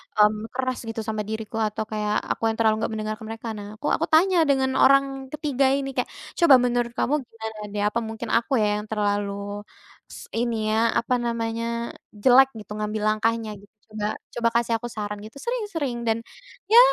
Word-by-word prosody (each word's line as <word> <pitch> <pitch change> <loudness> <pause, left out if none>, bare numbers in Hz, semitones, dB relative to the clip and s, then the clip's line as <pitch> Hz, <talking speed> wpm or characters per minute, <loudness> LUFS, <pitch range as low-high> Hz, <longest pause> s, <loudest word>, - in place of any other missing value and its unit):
mmm, 210 +1 +3
keras 255 -1 -1
gitu 225 0 -4
sama 215 -1 -3
diriku 220 +1 -5
atau 215 -1 0
kayak 210 0 0
aku - - -3
yang 225 - -1
terlalu 220 -1 +3
nggak - - -3
mendengarkan 215 +1 -4
mereka. 225 +1 -6
Nah, 205 0 -7
aku 255 - -5
aku - - 0
tanya 365 +3 +5
dengan 265 -1 +3
orang 275 +1 +6 0.3
ketiga 290 -3 0
ini, 275 -1 -1
kayak, - - 0 0.3
"Coba 335 -6 +8
menurut 240 -1 +1
kamu 275 - 0
gimana, 220 -2 -8
deh? 205 - -1
Apa 235 - -1
mungkin 220 +1 -6
aku, 235 +4 -1
ya, 210 0 +2
yang 210 - -5
terlalu 205 -1 -2 0.4
s - - -11
ini, 225 -2 0
ya, 225 +1 +2
apa 250 +2 0
namanya, 230 -1 -2 0.5
jelek, 260 +5 +6
gitu, 215 -3 -11
ngambil 210 0 -2
langkahnya, 225 +1 0
gitu, 205 +2 -19 0.2
coba 215 -1 -4 0.3
coba 235 -1 +3
kasih 235 -1 -2
aku 225 - -8
saran," 210 -1 -4
gitu. 220 +6 -12
Sering 485 -1 -2
sering 280 -7 -2
dan, 225 - +3 0.5
ya, 460 +2 +9
225 Hz, 190 wpm, -24 LUFS, 215-245 Hz, 0.5 s, ya